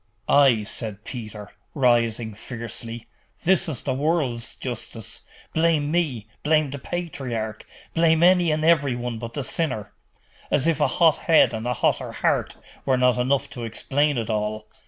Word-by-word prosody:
'Ay,' 135 Hz, -6 st, +5 dB
said 105 Hz, 0 st, -5 dB
Peter, 105 Hz, -4 st, -8 dB, 0.2 s
rising 120 Hz, -4 st, +2 dB
fiercely, 115 Hz, +1 st, -6 dB, 0.4 s
that 180 Hz, -, +3 dB, 0.2 s
is 135 Hz, -7 st, -3 dB
the 135 Hz, -, -1 dB
world's 135 Hz, -4 st, -1 dB
justice! 120 Hz, -3 st, -6 dB, 0.3 s
Blame 160 Hz, -2 st, +2 dB
me, 150 Hz, -11 st, 0 dB, 0.2 s
blame 155 Hz, -2 st, +2 dB
the 140 Hz, -, -5 dB
patriarch, 125 Hz, -10 st, -4 dB, 0.3 s
blame 165 Hz, 0 st, +3 dB
any 180 Hz, -1 st, +5 dB
and 155 Hz, 0 st, 0 dB
every 145 Hz, -6 st, +3 dB
one 120 Hz, -1 st, -4 dB
but 115 Hz, 0 st, -7 dB
the 145 Hz, -, -2 dB
sinner. 125 Hz, -11 st, -2 dB, 0.6 s
As 140 Hz, -, +2 dB
if 165 Hz, -2 st, +2 dB
a -, -, +4 dB
hot 165 Hz, -3 st, +4 dB
head 160 Hz, -7 st, +4 dB
and 110 Hz, +1 st, -4 dB
a 125 Hz, -, 0 dB
hotter -, -, 0 dB
heart -, -, 0 dB, 0.3 s
were 130 Hz, -1 st, +2 dB
not 125 Hz, -1 st, +3 dB
enough 130 Hz, +2 st, +1 dB
to 120 Hz, -, -7 dB
explain 140 Hz, +5 st, 0 dB
it 115 Hz, -2 st, -2 dB
all! 105 Hz, 0 st, -2 dB
125 Hz, 155 wpm, -24 LUFS, 115-155 Hz, 0.6 s, Ay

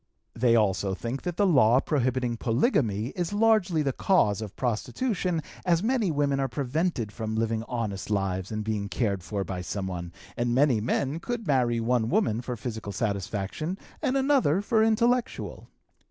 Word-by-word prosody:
They 115 Hz, 0 st, +3 dB
also 100 Hz, -3 st, +1 dB
think 120 Hz, +6 st, -4 dB
that 175 Hz, -2 st, -4 dB
the 205 Hz, -, +3 dB
law 130 Hz, -, +5 dB
prohibiting 130 Hz, -4 st, 0 dB
polygamy 115 Hz, -, +1 dB
is 175 Hz, +4 st, -3 dB
largely 205 Hz, -7 st, +3 dB
the 135 Hz, -2 st, 0 dB
cause 110 Hz, -, +2 dB
of 105 Hz, -3 st, -7 dB
prostitution, 170 Hz, -, -1 dB, 0.2 s
as 175 Hz, 0 st, +2 dB
many 230 Hz, -4 st, +1 dB
women 145 Hz, -2 st, +1 dB
are 135 Hz, -, +1 dB
prevented 135 Hz, -, -1 dB
from 110 Hz, 0 st, -4 dB
living 115 Hz, 0 st, 0 dB
honest 110 Hz, -6 st, -3 dB
lives 95 Hz, -2 st, -1 dB
and 110 Hz, 0 st, -2 dB
being 105 Hz, -2 st, -2 dB
cared 100 Hz, -6 st, -1 dB
for 100 Hz, +2 st, -3 dB
by 95 Hz, -2 st, -4 dB
someone, 90 Hz, -2 st, -4 dB, 0.2 s
and 120 Hz, 0 st, 0 dB
many 130 Hz, -5 st, +3 dB
men 135 Hz, +6 st, -1 dB
could 240 Hz, +4 st, -4 dB
marry 125 Hz, -5 st, +2 dB
one 115 Hz, -1 st, +1 dB
woman 160 Hz, -, +1 dB
for 125 Hz, 0 st, -5 dB
physical 110 Hz, -3 st, -5 dB
satisfaction 100 Hz, -, -3 dB, 0.2 s
and 260 Hz, -, +1 dB
another 265 Hz, -, +3 dB
for 220 Hz, +1 st, +2 dB
intellectual. 235 Hz, +2 st, 0 dB
125 Hz, 160 wpm, -27 LUFS, 110-170 Hz, 0.2 s, law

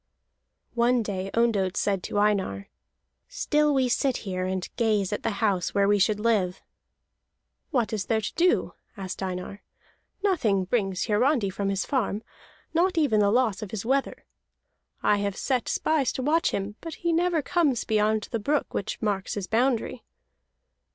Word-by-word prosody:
One 240 Hz, 0 st, +2 dB
day 195 Hz, -2 st, -3 dB
Ondott 205 Hz, -5 st, +1 dB
said 195 Hz, -2 st, 0 dB
to -, -, -3 dB
Einar: 195 Hz, -, 0 dB, 0.6 s
"Still 300 Hz, -12 st, +1 dB
we 265 Hz, -2 st, +2 dB
sit 255 Hz, +1 st, +1 dB
here, 185 Hz, -1 st, -2 dB
and 185 Hz, -1 st, -2 dB
gaze 210 Hz, -4 st, +1 dB
at -, -, -2 dB
the -, -, 0 dB, 0.2 s
house 190 Hz, -3 st, 0 dB
where 200 Hz, 0 st, +3 dB
we 205 Hz, 0 st, +3 dB
should 205 Hz, +2 st, +2 dB
live." 210 Hz, -5 st, +1 dB, 1.1 s
"What 245 Hz, -8 st, 0 dB
is 210 Hz, -2 st, -2 dB
there 225 Hz, -1 st, +2 dB
to 210 Hz, -, -4 dB
do?" 360 Hz, +1 st, +2 dB, 0.2 s
asked 190 Hz, -1 st, -6 dB
Einar. 185 Hz, +1 st, -5 dB, 0.6 s
"Nothing 225 Hz, -, +2 dB
brings 195 Hz, -3 st, 0 dB
Hiarandi 225 Hz, -1 st, +2 dB
from 195 Hz, +1 st, -2 dB
his 195 Hz, -1 st, -1 dB
farm, 225 Hz, -6 st, -1 dB, 0.5 s
not 355 Hz, +2 st, +2 dB
even 275 Hz, -9 st, +3 dB
the 205 Hz, -1 st, +4 dB
loss 225 Hz, -3 st, +2 dB
of 215 Hz, -, -5 dB
his 215 Hz, +1 st, -5 dB
wether. 270 Hz, +3 st, -1 dB, 0.8 s
I 210 Hz, -, +4 dB
have 200 Hz, -1 st, -2 dB
set 255 Hz, -3 st, -1 dB
spies 305 Hz, -5 st, +1 dB
to 260 Hz, -, -3 dB
watch 320 Hz, +4 st, +2 dB
him, 200 Hz, +2 st, -4 dB
but 330 Hz, -1 st, -6 dB
he 340 Hz, -1 st, -1 dB
never 340 Hz, -2 st, +1 dB
comes 295 Hz, -9 st, +1 dB
beyond 215 Hz, -1 st, +1 dB
the 230 Hz, -, -1 dB
brook 290 Hz, +7 st, -1 dB
which 200 Hz, -, -3 dB
marks 200 Hz, -3 st, -1 dB
his 200 Hz, -3 st, -3 dB
boundary." 235 Hz, +3 st, 0 dB
215 Hz, 165 wpm, -26 LUFS, 195-265 Hz, 1.1 s, the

